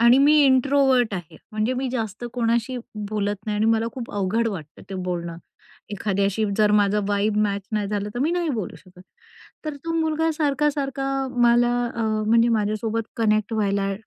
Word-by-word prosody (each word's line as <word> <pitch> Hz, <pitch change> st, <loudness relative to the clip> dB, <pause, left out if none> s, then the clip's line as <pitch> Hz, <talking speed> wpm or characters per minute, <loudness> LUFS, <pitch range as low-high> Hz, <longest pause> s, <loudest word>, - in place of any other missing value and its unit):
आणि 235 Hz, +2 st, +6 dB
मी 285 Hz, +2 st, +5 dB
इंट्रोव्हर्ट 260 Hz, -4 st, +3 dB
आहे. 170 Hz, -3 st, -7 dB, 0.2 s
म्हणजे 215 Hz, +4 st, 0 dB
मी 260 Hz, +1 st, -2 dB
जास्त 225 Hz, -2 st, -4 dB
कोणाशी 235 Hz, +1 st, 0 dB, 0.3 s
बोलत 205 Hz, -1 st, -1 dB
नाही 210 Hz, -1 st, -1 dB
आणि 215 Hz, -, +1 dB
मला 225 Hz, 0 st, +2 dB
खूप 245 Hz, -3 st, -7 dB
अवघड 205 Hz, +4 st, 0 dB
वाटतं 165 Hz, -8 st, -8 dB
ते -, -, -4 dB
बोलणं 175 Hz, -2 st, -4 dB, 0.5 s
एखाद्याशी. 200 Hz, +1 st, 0 dB
जर 210 Hz, -1 st, +4 dB
माझा 210 Hz, 0 st, +3 dB
व्हाइब 205 Hz, +1 st, 0 dB
मॅच 200 Hz, -1 st, -1 dB
नाही 210 Hz, -2 st, -1 dB
झालं, 205 Hz, 0 st, -2 dB
तर -, -, -3 dB
मी 295 Hz, +5 st, +1 dB
नाही 350 Hz, -1 st, 0 dB
बोलू 215 Hz, -, -3 dB
शकत. 180 Hz, +3 st, -18 dB, 0.6 s
तर 305 Hz, -2 st, -4 dB
तो 330 Hz, -, -2 dB
मुलगा 320 Hz, 0 st, +1 dB
सारखा-सारखा 285 Hz, -2 st, 0 dB, 0.4 s
मला, 240 Hz, 0 st, +4 dB, 0.2 s
अ 230 Hz, -, -2 dB, 0.2 s
म्हणजे 230 Hz, +1 st, +4 dB
माझ्यासोबत 220 Hz, 0 st, 0 dB
कनेक्ट 215 Hz, -1 st, +1 dB
व्हायला 200 Hz, -2 st, 0 dB
220 Hz, 165 wpm, -23 LUFS, 205-255 Hz, 0.6 s, आणि